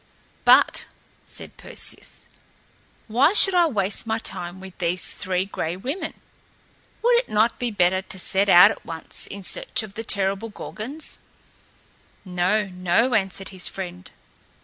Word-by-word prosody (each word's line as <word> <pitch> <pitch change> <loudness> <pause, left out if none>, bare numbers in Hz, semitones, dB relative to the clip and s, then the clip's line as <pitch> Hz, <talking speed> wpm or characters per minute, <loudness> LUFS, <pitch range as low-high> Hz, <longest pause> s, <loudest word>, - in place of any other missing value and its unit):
"But," - - +5 0.4
said - - -9
Perseus, - - -2 0.8
"why 255 - +3
should 390 -2 +6
I 350 -2 +5
waste 205 -4 -1
my 220 0 0
time 175 -4 -5
with 190 -1 -11
these 175 +1 +2
Three 185 0 -1
Gray 175 -3 -4
Women? 270 - -5 0.9
Would 480 0 +5
it - - -1
not 220 +2 +2
be 245 - -1
better 185 -3 +2
to 190 - -7
set 195 +2 +1
out 175 -1 +9
at - - -9
once 165 -1 -7
in 200 0 -9
search 200 - -1
of 205 -2 -10
the 225 - -6
terrible 200 +1 0
Gorgons?" 250 +8 -8 1.1
"No, 185 +4 +1
no," 185 +7 +1
answered 195 -2 -1
his 185 -2 -2
friend. 180 -1 -7
195 Hz, 145 wpm, -23 LUFS, 185-225 Hz, 1.1 s, out